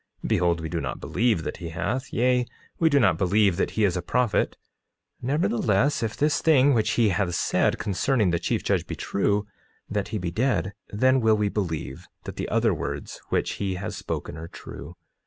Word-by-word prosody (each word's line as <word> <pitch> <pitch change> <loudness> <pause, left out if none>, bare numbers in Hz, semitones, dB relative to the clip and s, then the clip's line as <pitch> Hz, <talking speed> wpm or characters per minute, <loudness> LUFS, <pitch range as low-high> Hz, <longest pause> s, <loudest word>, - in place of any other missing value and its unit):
Behold, 85 -2 +2
we 80 - -3
do 85 0 -3
not 65 -3 -4
believe 110 -8 +1
that - - -4
he 85 - -6
hath; 115 +10 -3
yea, 125 +1 +2 0.3
we 165 - +4
do 145 -2 +4
not 120 - +3
believe 100 0 +3
that - - +1
he 110 - +3
is 95 -3 +2
a 90 - -1
prophet; 120 +5 0 0.6
nevertheless, 155 - +1
if 110 -2 -2
this 150 +1 +2
thing 145 -3 +5
which 110 -2 +1
he 115 -3 +3
has 90 -2 0
said - - +1
concerning 105 +1 +1
the 85 - +1
chief 85 - -1
judge - - 0
be - - -4
true, 100 +1 0 0.4
that 105 -2 -2
he 110 +1 -3
be 90 -3 -3
dead, 100 -3 0 0.2
then 130 +5 +3
will 110 -1 +4
we 105 -1 +1
believe 90 -7 -4 0.2
that - - -7
the - - -4
other - - +2
words - - -5
which - - 0
he 95 -2 -1
has 105 +3 -5
spoken 80 - -5
are 80 +1 -7
true. - - -10
105 Hz, 195 wpm, -25 LUFS, 90-125 Hz, 0.6 s, thing